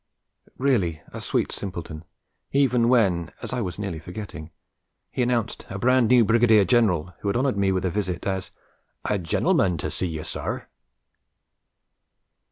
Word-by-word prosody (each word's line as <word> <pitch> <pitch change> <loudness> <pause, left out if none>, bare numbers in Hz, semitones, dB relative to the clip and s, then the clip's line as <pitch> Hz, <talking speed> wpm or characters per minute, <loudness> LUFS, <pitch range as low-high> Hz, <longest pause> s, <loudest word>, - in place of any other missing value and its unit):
Really 105 - +1
a - - -7
sweet - - 0
simpleton, 85 -4 -6 0.5
even 125 -4 +3
when 95 -9 +2
(as - - -4
I 125 - -1
was 90 -5 -4
nearly 100 -6 -4
forgetting) 90 -2 -8 0.6
he - - -2
announced 120 -2 -1
a - - -5
brand 125 -1 +3
new 125 -1 +5
Brigadier 115 -2 +5
General, 90 -8 +2
who - - -5
had 100 - +1
honoured 130 -1 +1
me 100 -1 +2
with 95 0 0
a 90 - 0
visit, 95 -3 -2
as 95 -1 -2 0.6
'A 105 - 0
gen'leman 85 +1 +1
to - - -3
see 90 - -2
you, 80 -2 -5
sir!' - - -4
100 Hz, 155 wpm, -24 LUFS, 90-120 Hz, 0.6 s, new